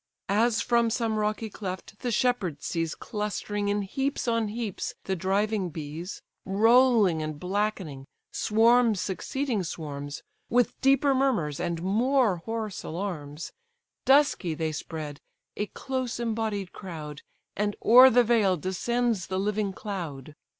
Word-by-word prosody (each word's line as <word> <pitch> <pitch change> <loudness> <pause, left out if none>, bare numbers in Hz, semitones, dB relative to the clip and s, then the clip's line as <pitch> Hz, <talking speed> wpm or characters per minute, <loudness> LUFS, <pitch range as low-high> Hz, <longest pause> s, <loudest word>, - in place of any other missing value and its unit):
As 220 +2 +2
from 235 -1 +3
some 225 -2 0
rocky 215 +1 -1
cleft 195 0 -7
the 250 - -2
shepherd 210 - 0
sees 165 -1 -2
Clustering 210 0 -3
in 205 0 0
heaps 270 +7 -2
on 230 -2 +1
heaps 215 -2 -4
the 190 - -1
driving 195 +2 0
bees, 160 +4 -7 0.2
Rolling 220 -3 +4
and 155 -1 -4
blackening, 180 -7 -2 0.3
swarms 225 0 +4
succeeding 235 +4 -2
swarms, 145 -4 -6 0.3
With 245 +1 +1
deeper 275 +1 +4
murmurs 230 - +1
and 170 -1 -2
more 230 +1 +2
hoarse 220 +2 -4
alarms; 160 -4 -5 0.5
Dusky 265 - +3
they 160 0 -1
spread, 150 -1 -6 0.4
a 210 - -2
close 255 -1 -4
embodied 220 -4 -2
crowd, 155 -6 -8 0.3
And 205 0 -1
o'er 255 +3 +9
the 245 0 +5
vale 215 -6 +3
descends 215 +4 -1
the 185 - -2
living 205 +1 0
cloud. 165 - -6
205 Hz, 130 wpm, -27 LUFS, 175-235 Hz, 0.5 s, o'er